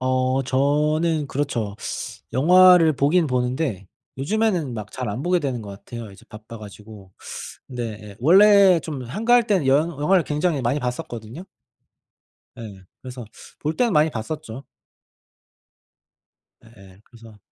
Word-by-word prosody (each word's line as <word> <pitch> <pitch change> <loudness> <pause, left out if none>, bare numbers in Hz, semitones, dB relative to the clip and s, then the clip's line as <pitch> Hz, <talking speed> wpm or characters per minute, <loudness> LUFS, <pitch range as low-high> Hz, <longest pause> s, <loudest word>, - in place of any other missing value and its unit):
어 130 +1 0
저는 150 +4 0
그렇죠. 130 -8 -3 0.6
영화를 175 +3 +6
보긴 150 +5 +2
보는데 125 - -2 0.3
요즘에는 175 - -1
막 110 -2 -7
잘 125 -4 -5
안 105 +5 -4
보게 180 +1 +2
되는 130 -6 -3
것 105 - -9
같아요. 110 +2 -9
이제 95 - -17
바빠 110 +2 -11
가지고. 105 -2 -13 0.6
근데 110 -4 -7
원래 195 - +6
좀 145 -5 -6
한가할 230 - +2
때는 190 - +1
영 145 +5 +3
영화를 180 +4 +3
굉장히 150 -1 -1
많이 125 +5 0
봤었거든요. 125 - -6 1.2
예. 100 -5 -10 0.2
그래서 125 -1 -8 0.3
볼 155 +2 -3
때는 240 -3 +1
많이 155 -1 +3
봤었죠. 135 +1 -7 2.0
예예. 100 -4 -18
그래서 115 -3 -16
135 Hz, 265 characters per minute, -22 LUFS, 115-160 Hz, 2.0 s, 영화를